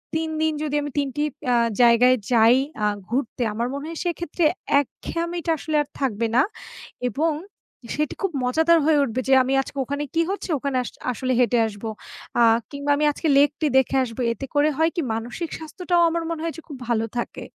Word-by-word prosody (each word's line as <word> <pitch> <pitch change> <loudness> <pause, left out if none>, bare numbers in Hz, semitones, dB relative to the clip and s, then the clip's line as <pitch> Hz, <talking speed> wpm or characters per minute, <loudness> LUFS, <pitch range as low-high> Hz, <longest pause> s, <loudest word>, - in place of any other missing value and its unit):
৩ 320 0 -1
দিন 315 -1 +2
যদি 295 -1 -2
আমি 290 -1 -5
৩ 285 -1 +1
টি 295 - 0 0.3
আ - - +4 0.3
জায়গায় 240 +2 +6 0.2
যাই 230 +1 +6 0.3
আ - - +3 0.2
ঘুরতে, 245 0 -2
আমার 235 +3 -1
মনে 280 +2 -5
হয় 330 - -6
সেক্ষেত্রে 345 -1 -1 0.3
একঘেয়েমিটা 335 +4 -3
আসলে 310 +1 -3
আর 290 - -4
থাকবে 230 -4 0
না 255 - +6 0.7
এবং 310 +7 0 0.6
সেটি 300 0 -1
খুব 390 -3 0
মজাদার 320 +6 +4
হয়ে 310 -2 +4
উঠবে 255 0 -2
যে 270 - +4
আমি 265 +1 -1
আজকে 275 - -10
ওখানে 285 +3 -3
কি 330 - +4
হচ্ছে 395 - -5
ওখানে 275 -1 -1
আস - - -6 0.2
আসলে 255 +1 -2
হেঁটে 240 -1 +3
আসবো। 215 +1 -6 0.5
আ - - +5 0.3
কিংবা 285 0 -2
আমি 300 - +2
আজকে 315 +2 -3
লেকটি 290 +2 +3
দেখে 265 +1 +2
আসব। 230 -2 -7 0.2
এতে 270 - -7
করে 295 +1 +4
হয় 320 +1 +3
কি? 340 - 0
মানসিক 240 +9 -4
স্বাস্থ্যটাও 350 +2 -1
আমার 335 0 -2
মনে 325 -1 -3
হয় 330 - -2
যে - - -8
খুব 285 -5 -8
ভালো 225 -1 +1
থাকে। 240 - -4
285 Hz, 195 wpm, -23 LUFS, 250-320 Hz, 0.7 s, জায়গায়